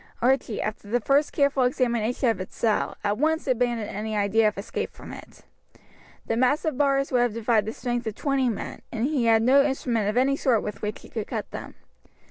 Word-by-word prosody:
Archie, 245 Hz, -3 st, +1 dB
after 215 Hz, -1 st, -4 dB
the 245 Hz, +3 st, +2 dB
first 280 Hz, +5 st, +2 dB
careful 280 Hz, -1 st, +2 dB
examination 245 Hz, -1 st, +1 dB
of 225 Hz, -4 st, +1 dB
his 185 Hz, -, -5 dB
cell, 220 Hz, -3 st, 0 dB
at 205 Hz, +1 st, 0 dB
once 320 Hz, +2 st, +1 dB
abandoned 240 Hz, -4 st, 0 dB
any 215 Hz, +1 st, -4 dB
idea 210 Hz, +2 st, +3 dB
of 210 Hz, -, -2 dB
escape 200 Hz, -, -4 dB
from -, -, -11 dB
it. -, -, -13 dB, 0.8 s
The 225 Hz, -, -1 dB
massive 275 Hz, +5 st, +1 dB
bars 275 Hz, 0 st, +1 dB
would 250 Hz, -2 st, +3 dB
have 240 Hz, -3 st, 0 dB
defied 225 Hz, -2 st, +1 dB
the -, -, -1 dB
strength 240 Hz, -2 st, -3 dB
of 215 Hz, -, -3 dB
twenty 275 Hz, -1 st, +1 dB
men, 220 Hz, -, -5 dB
and 230 Hz, +1 st, -1 dB
he 275 Hz, -4 st, 0 dB
had 225 Hz, -1 st, +4 dB
no 265 Hz, +4 st, +6 dB
instrument 245 Hz, -6 st, 0 dB
of 215 Hz, -, -2 dB
any 270 Hz, +2 st, +3 dB
sort 250 Hz, -6 st, +1 dB
with 210 Hz, -, -6 dB
which 210 Hz, 0 st, -4 dB
he -, -, -13 dB
could 220 Hz, -3 st, -4 dB
cut -, -, -5 dB
them. -, -, -8 dB
240 Hz, 210 wpm, -25 LUFS, 215-270 Hz, 0.8 s, no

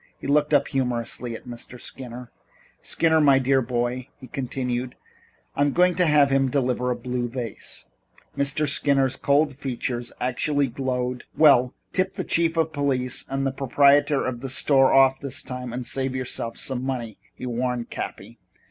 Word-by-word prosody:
He -, -, -11 dB
looked 150 Hz, +2 st, +2 dB
up 145 Hz, -2 st, +3 dB
humorously 120 Hz, -2 st, -2 dB
at -, -, -11 dB
Mr. 120 Hz, 0 st, -9 dB
Skinner. 125 Hz, -2 st, -8 dB, 0.5 s
"Skinner, 160 Hz, -1 st, +2 dB
my 140 Hz, -2 st, +6 dB
dear 135 Hz, 0 st, +2 dB
boy," 120 Hz, +1 st, -2 dB
he -, -, -10 dB
continued, 125 Hz, -1 st, -3 dB, 0.6 s
"I'm 145 Hz, 0 st, +2 dB
going 180 Hz, 0 st, +4 dB
to 180 Hz, 0 st, +2 dB
have 145 Hz, -2 st, +4 dB
him 135 Hz, -1 st, +3 dB
deliver 125 Hz, -2 st, 0 dB
a 125 Hz, -, 0 dB
blue 125 Hz, -1 st, -3 dB
vase." 115 Hz, -, -6 dB, 0.5 s
Mr. 140 Hz, +2 st, 0 dB
Skinner's 140 Hz, -2 st, +2 dB
cold 145 Hz, 0 st, +2 dB
features 125 Hz, -3 st, -4 dB
actually 140 Hz, +2 st, 0 dB
glowed. 125 Hz, 0 st, -3 dB
"Well, 130 Hz, -5 st, +5 dB, 0.2 s
tip 190 Hz, 0 st, 0 dB
the -, -, -3 dB
chief 165 Hz, 0 st, +1 dB
of 160 Hz, -1 st, +1 dB
police 130 Hz, -3 st, -1 dB
and 135 Hz, 0 st, -1 dB
the 135 Hz, -, +1 dB
proprietor 140 Hz, +2 st, +3 dB
of 120 Hz, -2 st, -3 dB
the 135 Hz, -, -5 dB
store 135 Hz, 0 st, +4 dB
off 135 Hz, 0 st, +5 dB
this 140 Hz, 0 st, -4 dB
time 125 Hz, -1 st, -6 dB
and 125 Hz, +1 st, -5 dB
save 130 Hz, 0 st, -2 dB
yourself 125 Hz, -2 st, -3 dB
some 130 Hz, -2 st, -2 dB
money," 120 Hz, -5 st, -4 dB, 0.2 s
he -, -, -7 dB
warned 125 Hz, 0 st, -2 dB
Cappy. -, -, -7 dB
130 Hz, 165 wpm, -24 LUFS, 125-140 Hz, 0.6 s, my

